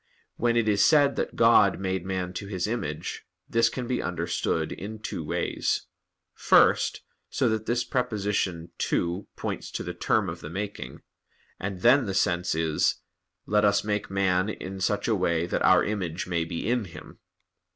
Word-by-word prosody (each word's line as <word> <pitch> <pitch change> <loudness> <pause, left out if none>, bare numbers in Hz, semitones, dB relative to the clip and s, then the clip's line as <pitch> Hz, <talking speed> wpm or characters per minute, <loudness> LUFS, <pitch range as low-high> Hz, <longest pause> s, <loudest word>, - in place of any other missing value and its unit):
When 120 0 +1
it 115 -2 +2
is 105 -1 +3
said 145 +2 +5
that - - -2
God - - +5
"made 95 -1 -2
man 90 -1 -3
to 100 +2 -6
His 95 -3 -2
image," 105 -10 -4 0.2
this 115 0 +3
can 125 +1 -5
be 125 0 -1
understood 85 -2 -1
in 110 +3 -6
two 110 - -5
ways: - - -1 0.5
first, - - +3 0.3
so - - +1
that 110 0 -2
this 120 +1 +1
preposition 105 -9 -1
"to" 90 +3 -1
points - - -4
to - - -4
the - - -5
term - - +1
of - - -5
the 75 - -7
making, 100 +4 -6 0.6
and 95 -1 -4
then 125 +2 +5
the 95 - -2
sense 90 -3 +1
is, 80 -1 +1 0.5
"Let 105 0 +2
Us 100 -1 +3
make 105 0 -2
man 95 0 +1
in 95 -2 -6
such 100 +2 0
a 115 - +2
way 85 -4 +1
that 90 - -2
Our - - +5
image 95 -5 -3
may 85 -2 -1
be 85 +3 -4
in 120 -2 +1
him." 85 - -12
100 Hz, 170 wpm, -26 LUFS, 90-110 Hz, 0.6 s, said